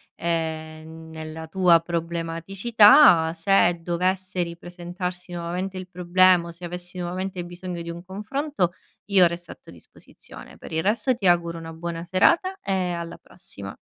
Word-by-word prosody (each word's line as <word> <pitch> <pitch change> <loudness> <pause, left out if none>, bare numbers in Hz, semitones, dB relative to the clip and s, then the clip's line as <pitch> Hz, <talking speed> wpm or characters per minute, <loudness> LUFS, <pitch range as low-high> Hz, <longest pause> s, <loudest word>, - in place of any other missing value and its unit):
ehm, 160 -1 -4
nella 160 0 -8
tua 175 -2 +4
problematicità. 170 - +4
Se 175 0 +3
dovesse 185 +2 -1
ripresentarsi 175 +1 -7
nuovamente 180 +3 -4
il 185 0 -8
problema, 180 0 +3
o - - -7
se 170 +1 -15
avessi 175 +1 -6
nuovamente 180 +1 -4
bisogno 175 0 -7
di 170 - -7
un 170 0 -7
confronto, 210 - -2 0.4
io 190 -2 +6
resto 170 0 -7
a - - -11
tua - - -14
disposizione. - - -14
Per - - -11
il 160 0 -1
resto, 230 +6 +1
ti 200 -5 -1
auguro 170 -1 +2
una 165 0 -8
buona 170 +1 -5
serata 340 - +2
e 185 -2 -1
alla 170 -1 -5
prossima. 100 - -10
175 Hz, 145 wpm, -24 LUFS, 170-185 Hz, 0.4 s, io